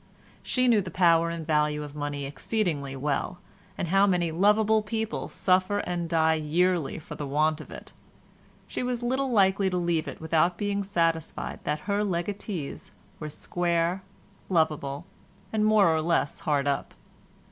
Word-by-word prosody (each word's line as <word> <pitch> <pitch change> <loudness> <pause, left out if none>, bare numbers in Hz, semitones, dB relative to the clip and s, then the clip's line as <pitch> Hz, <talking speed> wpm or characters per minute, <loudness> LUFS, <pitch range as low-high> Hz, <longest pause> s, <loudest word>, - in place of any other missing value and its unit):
She 255 -1 +1
knew 225 -4 +5
the 185 - -6
power 170 -1 +4
and 170 -1 -5
value 150 -1 +1
of 145 -1 -8
money 145 -1 -4
exceedingly 145 -3 -2
well, 145 +5 -2 0.4
and 175 - -2
how 195 +2 +4
many 175 -3 +1
lovable 210 +5 +3
people 220 +1 -3
suffer 185 +2 +2
and 175 -4 -2
die 160 -1 +3
yearly 160 +1 +1
for 155 - -9
the 145 - -5
want 155 +2 +1
of - - -12
it; - - -11 0.7
she - - -4
was 250 -1 -2
little 260 +2 0
likely 195 -2 +3
to 180 - -1
leave 170 -3 0
it - - -7
without 165 +2 +1
being 205 -1 -1
satisfied 165 -4 -1
that 150 0 -1
her 205 0 0
legatees 185 -3 -4 0.3
were 150 - -5
square, 170 +3 -1 0.5
lovable, 155 -3 0 0.5
and 215 -1 +2
more 210 -6 +5
or 160 - +1
less 160 -3 0
hard 145 -2 0
up. 140 -1 -2
170 Hz, 160 wpm, -27 LUFS, 155-200 Hz, 0.7 s, knew